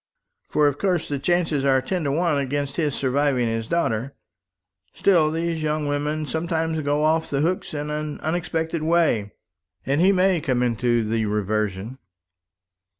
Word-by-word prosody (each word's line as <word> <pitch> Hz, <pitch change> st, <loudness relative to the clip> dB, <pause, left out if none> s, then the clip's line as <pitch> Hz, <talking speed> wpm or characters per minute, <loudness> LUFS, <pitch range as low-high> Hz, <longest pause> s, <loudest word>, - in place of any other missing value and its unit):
"For 150 Hz, -1 st, +3 dB
of 145 Hz, 0 st, -1 dB
course 180 Hz, -4 st, 0 dB
the 140 Hz, -1 st, -3 dB
chances 165 Hz, -3 st, +1 dB
are 135 Hz, -1 st, +4 dB
ten 175 Hz, +6 st, -2 dB
to 140 Hz, -, +1 dB
one 160 Hz, -1 st, +1 dB
against 140 Hz, +1 st, -2 dB
his 150 Hz, -5 st, 0 dB
surviving 135 Hz, -1 st, +1 dB
his 115 Hz, 0 st, -2 dB
daughter. 135 Hz, -5 st, -1 dB, 0.8 s
Still 170 Hz, -6 st, +3 dB
these 165 Hz, 0 st, -2 dB
young 155 Hz, 0 st, -1 dB
women 150 Hz, +2 st, -1 dB
sometimes 160 Hz, +2 st, -1 dB
go 145 Hz, +1 st, 0 dB
off 160 Hz, +1 st, +2 dB
the 140 Hz, 0 st, 0 dB
hooks 180 Hz, +4 st, -1 dB
in 150 Hz, +1 st, -3 dB
an 150 Hz, 0 st, -4 dB
unexpected 160 Hz, 0 st, -2 dB
way, 155 Hz, -11 st, +1 dB, 0.5 s
and 140 Hz, +4 st, +1 dB
he 190 Hz, +2 st, +5 dB
may 185 Hz, -3 st, +2 dB
come 130 Hz, -4 st, 0 dB
into 120 Hz, 0 st, +1 dB
the 110 Hz, 0 st, 0 dB
reversion." 105 Hz, +3 st, -2 dB
150 Hz, 155 wpm, -23 LUFS, 130-165 Hz, 0.8 s, he